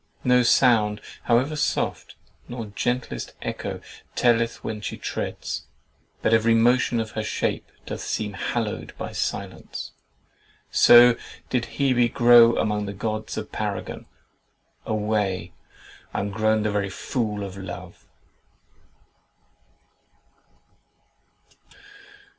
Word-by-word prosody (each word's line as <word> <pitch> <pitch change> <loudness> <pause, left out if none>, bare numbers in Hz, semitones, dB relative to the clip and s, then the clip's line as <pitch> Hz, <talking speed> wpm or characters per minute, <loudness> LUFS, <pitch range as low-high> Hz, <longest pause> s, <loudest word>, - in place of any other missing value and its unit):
No 125 0 +5
sound 110 -4 +4 0.3
(however 130 +6 +2
soft) 150 - -1 0.3
Nor 120 -2 -5
gentlest 125 +3 -2
echo - - -4 0.3
telleth 115 -1 +2
when 105 -1 -4
she - - -5
treads, - - -4 0.6
But 110 - +3
every 115 +1 +4
motion 120 +1 +3
of 110 -1 -3
her 110 - -3
shape 105 - -2
doth - - -5
seem 105 -2 -3
Hallowed 110 +2 -3
by - - -5
silence. - - -4 0.8
So 120 0 +8 0.3
did 125 -2 +1
Hebe 125 -4 +3
grow 120 -2 +7
Among 105 -1 0
the 100 - -4
gods 110 +2 -4
a - - -1
paragon! - - -5 0.8
Away, 105 -5 -1 0.6
I'm 100 +1 -1
grown 110 +1 +1
The 105 - 0
very 100 -1 -1
fool 105 +1 -3
of 95 -1 -6
Love!" 90 -2 -9
110 Hz, 105 wpm, -24 LUFS, 105-120 Hz, 0.8 s, So